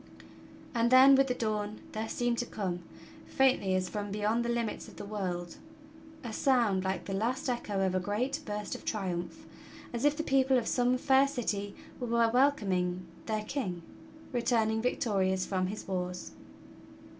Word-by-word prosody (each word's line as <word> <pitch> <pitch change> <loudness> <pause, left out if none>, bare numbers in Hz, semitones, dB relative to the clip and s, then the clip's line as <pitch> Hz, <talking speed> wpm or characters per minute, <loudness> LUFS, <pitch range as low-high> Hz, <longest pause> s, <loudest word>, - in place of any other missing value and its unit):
And 235 -1 +2
then, 260 +2 +8
with 270 0 +5
the 250 - 0
dawn 215 -2 -2
there 220 +1 -4
seemed 240 -1 0
to 240 - 0
come, 185 -4 -3 0.5
faintly 255 -8 +2
as 185 0 0
from 205 +1 -4
beyond 210 +3 0
the 235 - -2
limits 235 -2 -2
of - - -13
the - - -7
world, 180 -4 -4 0.7
a 235 -3 -5
sound 230 -8 +2
like 190 -2 -2
the 195 - -4
last 250 +9 -1
echo 210 -6 -1
of 185 - 0
a 185 - +2
great 235 - -1
burst 210 -3 -4
of - - -7
triumph, 180 -5 -3 0.5
as 235 - -3
if 295 0 +3
the 315 - -1
people 265 -2 +3
of 240 - 0
some 250 +2 +2
fair 270 +1 +4
city 205 -7 -3 0.2
were 245 - -3
welcoming 225 -7 +2 0.2
their 215 -1 -1
king, 200 -8 -3 0.5
returning 225 -2 +1
victorious 190 -6 +1
from 185 -2 0
his 210 +3 -6
wars. 180 -1 -3
215 Hz, 165 wpm, -31 LUFS, 190-250 Hz, 0.7 s, then